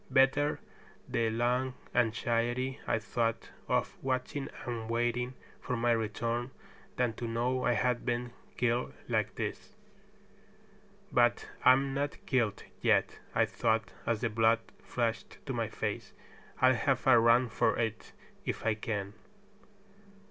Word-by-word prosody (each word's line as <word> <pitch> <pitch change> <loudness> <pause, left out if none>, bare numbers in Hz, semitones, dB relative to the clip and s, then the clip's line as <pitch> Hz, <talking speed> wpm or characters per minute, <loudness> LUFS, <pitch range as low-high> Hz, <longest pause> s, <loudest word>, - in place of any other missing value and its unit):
Better 140 +2 +3 0.5
the 115 -1 +1
long 125 +3 0 0.2
anxiety, 120 +2 +1
I - - +2
thought, 115 +1 -2 0.2
of - - 0
watching 130 +1 -2 0.2
and 115 -2 -4
waiting 120 +2 0 0.2
for 125 - -3
my 120 +1 +2
return 115 +2 -1 0.5
than 125 -2 +1
to 120 - -3
know 125 +3 0
I 125 - +4
had 125 -1 +1
been 120 0 -2 0.2
killed 120 0 0
like - - 0
this. - - -5 1.4
"But - - +3 0.2
I'm 135 +1 +5
not 140 +1 -1
killed 120 -6 +1 0.2
yet," - - +2 0.2
I - - +5
thought, 110 -2 0
as 115 -2 +1
the 115 - +1
blood 115 +1 +4 0.2
flushed 115 -2 -2
to - - -3
my - - -1
face. - - -4 0.5
"I'll 130 0 +6
have 130 +1 0
a 130 -3 +7
run 120 +2 +5
for 110 - +1
it, 115 -2 -2 0.3
if - - -3
I 115 - +3
can." 105 -2 -3
120 Hz, 135 wpm, -31 LUFS, 115-125 Hz, 1.4 s, a